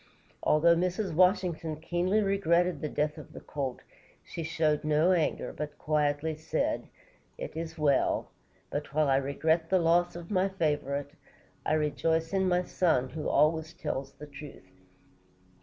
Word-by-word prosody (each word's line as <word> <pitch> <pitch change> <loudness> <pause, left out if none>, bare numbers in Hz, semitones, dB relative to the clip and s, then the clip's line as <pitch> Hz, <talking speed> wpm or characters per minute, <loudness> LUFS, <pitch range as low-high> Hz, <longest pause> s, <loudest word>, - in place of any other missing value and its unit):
Although 170 +2 +4
Mrs. 180 +1 -1
Washington 175 -2 +2
keenly 175 +6 0
regretted 180 -3 +2
the 150 - -2
death 150 +2 -1
of 150 - -12
the - - -8
colt, 135 -3 -4 0.4
she - - -7
showed 155 -2 0
no 155 +4 +3
anger, 170 -4 0
but 150 -1 -6
quietly 150 +1 0
said: 155 - -2 0.5
"It - - -6
is 160 0 -5
well; 150 -3 +1 0.4
but 145 0 -4
while 155 -1 +3
I 135 - +4
regret 160 +4 0
the 190 - +4
loss 175 0 +2
of 170 +1 -8
my 190 0 +2
favorite, 145 -5 -1 0.6
I - - +2
rejoice 160 +3 0
in 190 -1 +2
my 180 0 +2
son, 160 -9 +1
who 155 +2 -4
always 155 +2 +3
speaks 135 -4 -4
the 150 - -10
truth." 140 -10 -12
160 Hz, 150 wpm, -29 LUFS, 150-175 Hz, 0.6 s, Although